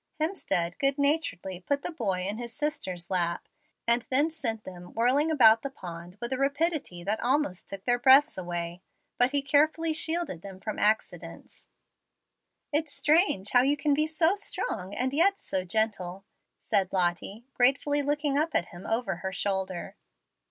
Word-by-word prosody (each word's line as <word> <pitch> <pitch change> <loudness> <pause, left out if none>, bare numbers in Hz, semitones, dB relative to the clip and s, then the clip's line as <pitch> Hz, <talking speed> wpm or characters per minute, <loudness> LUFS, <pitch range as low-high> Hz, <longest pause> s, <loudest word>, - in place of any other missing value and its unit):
Hemstead 180 - -1
good 275 0 +1
naturedly 280 - 0
put 280 +9 -2
the - - -2
boy 200 - -2
in 205 +4 -3
his 240 -1 -6
sister's 210 - -3
lap, 170 -2 -1 0.4
and 235 +1 +3
then 290 +4 +2
sent 225 -9 -3
them 180 -1 -11
whirling 260 +7 +2
about 225 -7 +6
the 275 - -4
pond 175 -6 -10
with 240 +2 -3
a 260 - -3
rapidity 280 - 0
that 210 +4 -1
almost 250 -7 0
took 195 -1 -6
away - - -45
their 245 0 +2
breaths. 270 +4 +6 0.8
But 245 - +5
he 285 0 0
carefully 310 +3 +2
shielded 320 - +1
them 195 -1 -10
from 215 +2 -5
accidents. 175 -6 -2 1.1
"It's 300 0 0
strange 285 - +2
how 245 - +6
you 280 +3 +2
can 290 0 +1
be 305 +2 +1
so 320 +3 +2
strong, 205 - -4
and 260 +1 -1
yet 385 +7 +4
so 190 - -2
gentle," 195 -1 -1 0.3
said 190 -2 0
Lottie, 185 +5 -1
gratefully 280 +3 +3
looking 290 0 0
up 315 0 -1
at 170 - +1
him 175 +1 -10
over 225 -5 -1
her 190 +2 -4
shoulder. 190 -2 -3
245 Hz, 165 wpm, -28 LUFS, 190-295 Hz, 1.1 s, about